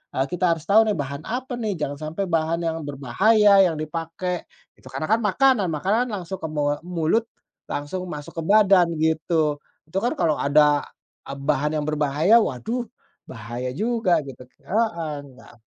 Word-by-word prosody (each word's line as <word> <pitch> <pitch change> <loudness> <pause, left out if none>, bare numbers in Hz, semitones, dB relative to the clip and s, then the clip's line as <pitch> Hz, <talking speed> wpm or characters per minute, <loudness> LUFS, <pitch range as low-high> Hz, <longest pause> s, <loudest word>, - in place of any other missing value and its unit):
eee, 135 - +1
kita 180 +1 0
harus 160 - -11
tahu 215 +3 +7
nih, 210 - +1
bahan 140 +2 -7
apa 250 +2 -4
nih? 215 -3 -1
Jangan 145 -1 -3
sampai 160 +6 -3
bahan 165 +1 +1
yang 165 0 -2
berbahaya 195 - +3 0.2
yang 165 - -2
dipakai, 165 +3 -4 0.3
itu - - -16
karena 135 +4 -4
kan 220 - +4
makanan, 220 0 +2
makanan 205 +10 +1
langsung 185 -1 -6
ke 160 - -4
mu 145 -1 -1
mulut, 180 +6 0 0.4
langsung 180 +6 -4
masuk 150 0 -7
ke - - -3
badan 195 -4 +5
gitu. 155 -1 0 0.2
Itu 175 +5 -3
kan 240 +8 -1
kalau 160 - +1
ada 145 0 +3 0.4
a - - -5
bahan 150 +2 -1
yang 150 - -1
berbahaya, 155 +8 +3
waduh, 230 - -2 0.4
bahaya 120 +2 -5
juga 225 -2 +1
gitu, 130 -1 -10 0.2
heeh, 170 -8 -1 0.2
gak 120 - -18
165 Hz, 165 wpm, -23 LUFS, 145-205 Hz, 0.4 s, tahu